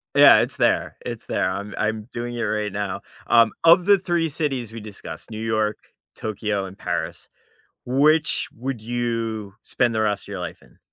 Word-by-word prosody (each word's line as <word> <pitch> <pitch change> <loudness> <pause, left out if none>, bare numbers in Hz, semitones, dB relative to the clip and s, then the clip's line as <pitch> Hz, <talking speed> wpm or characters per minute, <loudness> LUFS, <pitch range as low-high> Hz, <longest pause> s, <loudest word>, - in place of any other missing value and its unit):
Yeah, - - +9
it's - - -3
there, - - +1
it's - - -5
there - - 0
I'm 100 +2 -5
I'm 110 +1 -2
doing 120 0 -4
it 120 - -3
right 105 -2 -1
now. 100 -1 -3 0.3
Um, 115 -1 +5
of 170 +2 +7
the 200 -1 +6
3 175 -3 0
cities 135 -7 -2
we 115 - -6
discussed, 105 +1 -8
New 110 -1 -6
York, 110 -1 0 0.4
Tokyo, 105 -2 -2
and 95 +1 -10
Paris, - - -4 0.6
which 150 +5 +2
would 125 -1 -4
you 115 -3 -3
spend 120 -2 0
the 110 - +1
rest 105 -2 0
of - - -16
your 100 -3 -5
life 85 - -6
in? - - -22
110 Hz, 180 wpm, -23 LUFS, 105-125 Hz, 0.6 s, Yeah